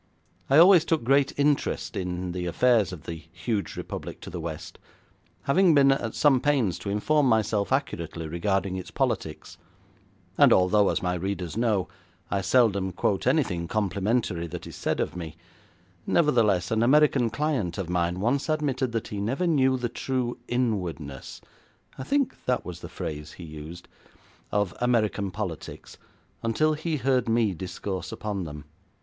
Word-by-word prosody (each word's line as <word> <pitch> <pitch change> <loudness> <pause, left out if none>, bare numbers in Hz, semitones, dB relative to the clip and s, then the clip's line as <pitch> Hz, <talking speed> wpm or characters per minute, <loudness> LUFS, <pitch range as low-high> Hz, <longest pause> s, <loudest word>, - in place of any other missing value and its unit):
I 135 - +5
always 175 0 +8
took 165 -5 0
great 135 +3 +3
interest 145 0 0
in 90 -1 -3
the 90 0 -3
affairs 115 +2 +3
of 85 -4 -9
the 80 -2 -7
huge 110 -4 -3
republic - - -6
to - - -8
the 90 - -5
west, 80 -1 -7 0.6
having 175 +3 +4
been 140 -1 +6
at 120 -4 -1
some 135 -4 +4
pains 135 -11 +1
to 100 - -5
inform 140 +8 +2
myself 110 -2 +1
accurately 85 - -2
regarding 95 +3 -1
its 95 - -7
politics, 80 -1 -3 0.8
and - - +7
although, 95 +2 +4
as - - -1
my 90 0 0
readers 90 -2 -3
know, 110 -5 +1 0.4
I 100 +1 +1
seldom 100 -2 +2
quote 95 +5 0
anything 105 - +1
complimentary 100 -2 -1
that 85 +1 -7
is - - -9
said - - -2
of - - -2
me, 85 -1 -7 0.7
nevertheless, 110 - +2
an 110 0 +2
American 135 -1 +4
client 120 - -1
of 95 - -3
mine 90 0 0
once 130 - 0
admitted 135 -5 0
that 115 - -3
he 100 -1 -4
never 130 - -1
knew 130 -6 +3
the 120 -1 -2
true 125 0 -3
inwardness 90 - -3 0.6
I - - -3
think 280 - 0
that 125 -1 0
was 90 - -7
the - - -9
phrase 75 0 -6
he 90 - -11
used 80 +2 -9 0.6
of 105 -3 0
American 110 -5 +1
politics 90 -4 -7 0.4
until 155 +8 +1
he 155 +1 -2
heard 130 -2 +1
me 115 -3 +2
discourse 90 +2 -5
upon 105 -4 -4
them. 75 -1 -8
105 Hz, 155 wpm, -26 LUFS, 90-130 Hz, 0.8 s, always